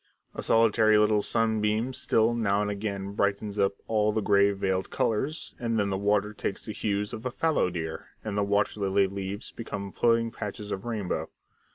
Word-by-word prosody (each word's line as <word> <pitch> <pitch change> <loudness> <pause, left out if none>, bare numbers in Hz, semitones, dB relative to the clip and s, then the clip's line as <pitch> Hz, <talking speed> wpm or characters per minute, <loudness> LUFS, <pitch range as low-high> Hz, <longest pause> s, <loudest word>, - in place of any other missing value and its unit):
A - - -5
solitary 110 -1 +4
little 105 0 +4
sunbeam 110 +2 +1
still 115 -1 +2
now 105 -3 +1
and 105 - -1
again 100 -1 -4
brightens 100 0 -1
up 100 0 +3
all 105 -1 +2
the 110 - 0
grey 100 -1 +4
veiled 95 -1 -1
colours, 135 +9 -1
and 115 -2 -1
then 100 -1 0
the - - 0
water 105 +1 +1
takes 105 - -4
the 110 - -4
hues 105 0 -2
of 110 - -6
a 125 - -1
fallow 155 - +1
deer, 80 -2 -5 0.2
and 105 -2 -4
the 105 - +1
water 100 +1 +1
lily 100 0 +3
leaves 100 +2 -5
become 100 -4 -6
floating 115 +1 +2
patches 105 -1 -6
of 95 +2 -4
rainbow. 110 -6 -2
105 Hz, 185 wpm, -27 LUFS, 100-110 Hz, 0.2 s, solitary